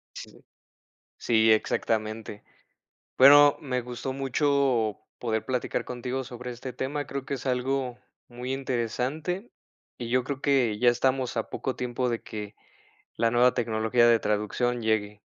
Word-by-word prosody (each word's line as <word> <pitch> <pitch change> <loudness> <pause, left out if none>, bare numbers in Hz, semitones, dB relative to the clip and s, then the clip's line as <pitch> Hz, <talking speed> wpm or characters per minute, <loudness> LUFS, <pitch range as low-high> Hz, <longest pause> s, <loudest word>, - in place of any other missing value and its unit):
Sí. - - -11 0.7
Sí, 110 -1 +3
exactamente. 110 -1 -1 0.7
Bueno, 145 +2 +8
me 130 -3 -2
gustó 125 +2 -5
mucho 135 -4 +1 0.2
poder 110 -2 -2
platicar 125 -2 -2
contigo 125 +1 -4
sobre 125 0 -7
este 125 +2 -7
tema, 140 +3 -3
creo 140 -1 -5
que 140 - -3
es 135 0 -7
algo 130 0 -1 0.3
muy 125 +1 -5
interesante, 135 - -2 0.5
y 120 - -5
yo 130 +1 +2
creo 140 0 -4
que 130 -7 +2
ya 125 - +4
estamos 130 +1 0
a 115 - -2
poco 130 - -3
tiempo 125 0 -2
de 115 -1 -2
que 105 -1 -7 0.6
la 115 0 +1
nueva 120 +1 +4
tecnología 115 0 +2
de 115 -1 +5
traducción 105 +4 -1
llegue. 105 -2 -1
125 Hz, 140 wpm, -27 LUFS, 115-130 Hz, 0.7 s, Bueno